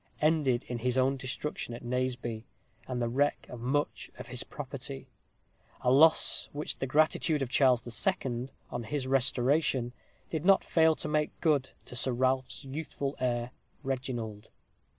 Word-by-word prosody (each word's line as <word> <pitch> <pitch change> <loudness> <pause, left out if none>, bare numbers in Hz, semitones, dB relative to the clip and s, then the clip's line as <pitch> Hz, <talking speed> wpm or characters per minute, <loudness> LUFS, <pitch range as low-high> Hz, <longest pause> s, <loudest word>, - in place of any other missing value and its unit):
ended 150 -6 +2
in 120 -1 -3
his 125 +2 0
own 130 +1 +3
destruction 130 -1 -4
at 120 - -10
Naseby, 120 -2 -2 0.4
and 125 -1 -2
the 120 - 0
wreck 140 +5 +1
of 125 - -7
much 135 +5 -1
of - - -9
his - - -2
property; 65 - -7 0.7
a 125 - +3
loss 160 +4 +5
which 150 +1 -3
the 135 - -1
gratitude 155 +1 +2
of 130 - -4
Charles 130 -4 +4
II., 125 - -1 0.2
on 120 -2 -4
his 135 +3 -2
restoration, 130 -1 +2 0.4
did 160 -2 -2
not 195 +1 +5
fail 160 -1 +4
to - - -4
make 150 0 0
good 145 -5 +2 0.2
to - - -9
Sir 125 +1 +1
Ralph's 130 +1 0
youthful 140 0 -4
heir, 120 -1 -1 0.3
Reginald. 125 -6 -4
130 Hz, 150 wpm, -30 LUFS, 120-145 Hz, 0.7 s, loss